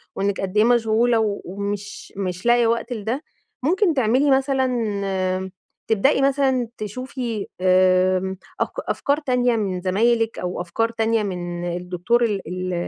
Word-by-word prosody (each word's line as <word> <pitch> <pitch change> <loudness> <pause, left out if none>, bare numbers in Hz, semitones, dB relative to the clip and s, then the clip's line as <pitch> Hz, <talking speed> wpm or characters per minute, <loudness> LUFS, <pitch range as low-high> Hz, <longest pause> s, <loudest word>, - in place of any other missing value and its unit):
وإنِك 200 0 -1
قد 195 +1 -3
إيه 215 - +6
مشغولة 225 -2 +2
ومش 200 +2 -5
مش 180 -1 -4
لاقيه 240 -1 +4
وقت 235 +2 -1
لِده، 230 +6 -3 0.4
ممكن 360 +4 +2
تعملي 260 +2 +2
مثلًا 205 -9 0 0.4
تبدئي 230 +6 +3
مثلًا 270 -3 +2
تشوفي 230 0 -4
آآ 185 0 +3 0.2
أف - - +1
أفكار 285 +1 0
تانية 250 -4 +1
من 190 -4 -2
زمايلِك 225 +4 +1
أو 180 0 -3
أفكار 205 +6 -1
تانية 225 -1 0
من 175 -2 -4
الدكتور 180 +7 0
ال 205 -4 -1
ال 185 +1 -3
220 Hz, 130 wpm, -22 LUFS, 185-245 Hz, 0.4 s, إيه